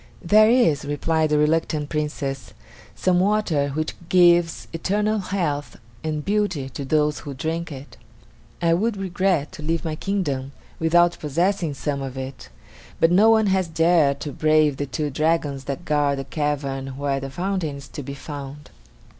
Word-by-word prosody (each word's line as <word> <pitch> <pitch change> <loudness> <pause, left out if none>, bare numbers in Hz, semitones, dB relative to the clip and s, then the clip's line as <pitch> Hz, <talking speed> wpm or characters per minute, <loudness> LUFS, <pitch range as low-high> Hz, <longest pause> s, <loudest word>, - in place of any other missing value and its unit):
"There 215 +5 +6
is," 230 - +3
replied 155 +2 0
the 150 - +2
reluctant 150 -1 +1
Princess, 150 -3 -3 0.4
"some 180 -1 +2
water 185 -8 +1
which 155 +3 -2 0.2
gives 175 -2 +4
eternal 210 +5 0
health 170 -7 -2 0.3
and 155 -2 -3
beauty 200 -10 0
to 140 - -6
those 150 +1 +1
who 145 -3 -7
drink 165 +4 -3
it. 140 0 -10 0.7
I 165 -1 +4
would 210 +5 0
regret 185 -5 0
to 180 - -10
leave 165 +2 -2
my 155 -1 -2
kingdom 145 -8 -2 0.3
without 175 +1 +3
possessing 170 +1 0
some 140 0 -3
of 135 -1 -6
it; 130 0 -7 0.5
but 165 - +4
no 205 +5 +6
one 220 -1 +5
has 190 -2 +1
dared 160 -3 +3
to 150 - -4
brave 155 -1 +2
the 145 - -3
two 145 +3 -3
dragons 150 -2 0
that 140 +5 -5
guard 145 -2 +1
the 135 - -3
cavern 135 -2 -3
where 140 -1 -1
the 135 0 -6
fountain 175 0 -2
is 140 -1 -10
to - - -7
be 140 +1 -7
found." 145 0 -8
155 Hz, 165 wpm, -23 LUFS, 140-175 Hz, 0.7 s, There